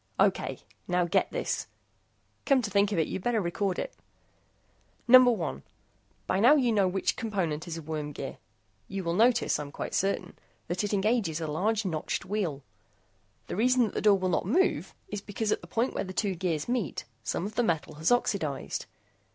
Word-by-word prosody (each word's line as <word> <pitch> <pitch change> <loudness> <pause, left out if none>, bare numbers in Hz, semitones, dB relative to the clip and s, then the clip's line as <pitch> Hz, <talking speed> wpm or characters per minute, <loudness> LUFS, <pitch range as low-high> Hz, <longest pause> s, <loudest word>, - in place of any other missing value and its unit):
"Okay. - - +1 0.2
Now 180 0 +2
get 170 - +2
this. - - -2 0.8
Come 270 -3 +4
to 205 - -3
think 200 +1 +3
of 200 - -1
it, 160 - +2
you'd - - -4
better 235 +2 +1
record 185 +1 -1
it. - - -4 1.1
Number 255 0 +9
one: 170 - -1 0.6
By 190 - 0
now 245 +8 +7
you 255 -5 +3
know 200 -3 +3
which 190 +1 0
component 185 -9 -2
is 165 -1 -4
a 165 - -7
worm 150 -1 -4
gear. - - -6 0.5
You 195 -1 -4
will 170 -1 -1
notice, 235 +5 +3
I'm 145 -1 -6
quite - - -5
certain, 195 -2 -1 0.3
that 175 +4 -1
it 205 - -1
engages 205 -5 +1
a 160 - -3
large 205 +8 0
notched 160 -5 -2
wheel. 180 -9 -2 0.8
The - - -5
reason 250 +4 +4
that 215 - -2
the - - -2
door 205 -2 +5
will 185 -1 -1
not 175 - 0
move 370 - +1
is 205 - -4
because 210 +1 -2
at - - 0
the 170 - -11
point 230 +8 0
where - - -1
the 185 -1 -7
two 195 +1 0
gears 170 -4 -2
meet, 240 - -2 0.2
some 135 - -2
of 210 - -5
the 240 - +1
metal 165 -8 -1
has 160 +7 +1
oxidized. 190 - 0
195 Hz, 190 wpm, -29 LUFS, 170-225 Hz, 1.1 s, Number